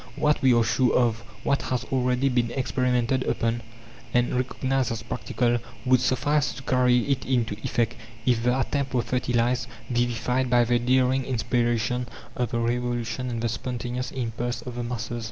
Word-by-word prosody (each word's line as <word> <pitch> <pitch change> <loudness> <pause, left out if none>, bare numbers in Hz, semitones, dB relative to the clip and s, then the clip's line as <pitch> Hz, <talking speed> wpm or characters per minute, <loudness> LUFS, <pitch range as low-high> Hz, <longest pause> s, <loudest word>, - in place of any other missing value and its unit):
What 150 0 +2
we 130 - +5
are 120 - +4
sure 120 +3 +2
of, 115 -2 +3 0.2
what 140 - +1
has 125 -2 -2
already 125 0 +2
been 120 -3 +1
experimented 125 0 0
upon, 115 -1 0 0.5
and 120 0 +2
recognized 130 0 0
as 115 -1 -4
practical, 120 0 0 0.3
would 130 0 +5
suffice 145 +4 +1
to 135 - -9
carry 125 -1 +3
it 140 -2 0
into 120 -5 0
effect, 120 -1 0 0.3
if 120 -3 +3
the 125 +2 +2
attempt 135 0 -1
were 120 - +2
fertilized, 120 -1 0 0.2
vivified 120 +1 0
by 120 -1 +5
the 120 +1 +2
daring 130 +2 +2
inspiration 120 0 0 0.3
of 125 -3 -1
the 120 - -2
Revolution 120 +1 -1
and 115 -1 -3
the 115 - +1
spontaneous 125 +1 -3
impulse 120 -1 -3
of 125 - -6
the 120 0 -4
masses. 120 0 -4
125 Hz, 165 wpm, -26 LUFS, 120-130 Hz, 0.5 s, we